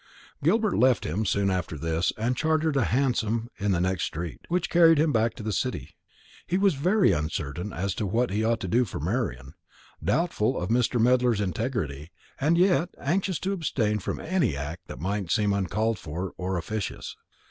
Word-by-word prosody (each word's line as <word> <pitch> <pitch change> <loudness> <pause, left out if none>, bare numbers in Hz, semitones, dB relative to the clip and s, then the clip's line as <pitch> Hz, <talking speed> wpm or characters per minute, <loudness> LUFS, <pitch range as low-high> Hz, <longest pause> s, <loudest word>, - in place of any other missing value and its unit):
Gilbert 210 +5 +2
left 130 -1 +3
him 100 +7 -1
soon 100 0 +1
after 90 -4 -2
this, 80 +3 0
and 120 +4 0
chartered 155 +1 +1
a 135 - +3
hansom 115 -2 0
in 100 0 +1
the 90 - +1
next 95 +1 0
street, 85 +1 -5
which 180 +2 0
carried 165 -2 +6
him 155 +1 +3
back 115 0 +1
to 115 - -8
the 110 -1 -2
City. - - -3 0.5
He 180 - +1
was 195 -1 +3
very 180 - +3
uncertain 80 +3 -3
as 95 +2 -2
to 105 - -2
what 115 +4 0
he 105 +3 0
ought 115 +1 +1
to 95 - -3
do 120 +7 +3
for 105 - -6
Marian, 75 - -2 0.5
doubtful 125 - +1
of 90 - -3
Mr. 120 +1 +2
Medler's 125 -1 +3
integrity, 90 - -2 0.3
and 155 +5 +3
yet 180 -1 +3
anxious 185 +4 0
to 195 +1 -1
abstain 115 - 0
from - - -4
any 160 - 0
act 80 +6 -6
that - - -8
might 100 0 -2
seem 105 -1 +2
uncalled 105 +3 0
for 85 +5 -5
or 95 0 -2
officious. 105 +3 -4
110 Hz, 185 wpm, -26 LUFS, 90-140 Hz, 0.5 s, carried